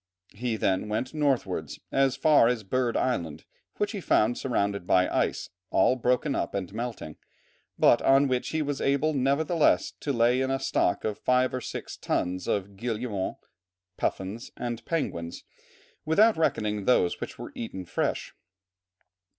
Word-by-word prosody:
He 115 +2 -2
then 95 0 0
went 110 +6 -2
northwards 145 -4 -1
as 135 -1 +2
far 145 -3 +5
as 120 -2 0
Bird 120 +3 0
Island, 80 -12 -2 0.3
which 205 - 0
he 205 -4 -5
found 115 -6 +2
surrounded 100 -8 -1
by 90 0 +4
ice, - - -1 0.2
all 130 - +3
broken 125 +3 +1
up - - -2
and 95 -1 -4
melting, 115 -9 -5 0.6
but - - +5
on 135 +1 +5
which 130 -1 -1
he 160 -1 -1
was 145 -2 -3
able, 140 +3 +2
nevertheless, 145 +4 +2
to 145 - -2
lay 120 +1 +3
in 130 - 0
a 135 0 0
stock 130 -8 0
of 105 -1 -3
five 125 0 +2
or 130 - -2
six - - -6
tons 90 +1 -2
of 100 0 -2
guillemots, 115 -3 -3 0.5
puffins, 100 +7 -3
and 120 -1 -4
penguins, 85 - -3 0.6
without 210 +8 +4
reckoning 105 -10 0
those 90 -7 +2
which - - -6
were - - -8
eaten 95 -5 -6
fresh. - - -2
125 Hz, 150 wpm, -27 LUFS, 100-135 Hz, 0.6 s, far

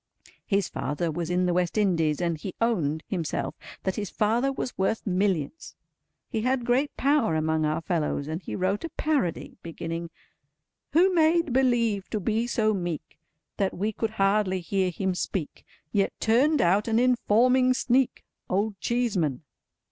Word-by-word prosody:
His 200 -3 +1
father 145 +5 -2
was 170 +1 -3
in 180 +1 +1
the 180 - +1
West 180 +2 0
Indies, 165 -7 +2
and 170 -2 0
he 175 +4 -7
owned, 160 -10 0
himself, 170 -6 -3 0.3
that 190 - -1
his 205 -2 -3
father 235 +6 +1
was 255 -1 -4
worth 195 +4 -1
Millions. 190 - -1 0.5
He 220 - -2
had 255 +1 0
great 260 +4 +1
power 275 - +2
among 155 0 +1
our 155 +2 -1
fellows, 155 -4 -1
and 160 +3 -4
he - - -6
wrote 190 +2 0
a 330 - -3
parody, 285 - -2
beginning— 165 0 -5 0.8
"Who 365 +4 +5
made 330 -3 +3
believe 235 -6 +2
to 215 - -2
be 225 +4 0
so 215 -2 +1
meek 175 -5 -4 0.4
That 195 -3 -1
we 210 +4 0
could 220 +1 -2
hardly 195 -1 +2
hear 190 +1 0
him 190 +1 -1
speak, 180 -3 -4 0.3
Yet 200 -1 0
turned 265 +6 +3
out 195 +6 +3
an 225 -1 +2
Informing 250 +1 +3
Sneak? 260 0 +1 0.2
Old 200 +2 0
Cheeseman." 195 - 0
200 Hz, 155 wpm, -26 LUFS, 175-240 Hz, 0.8 s, Who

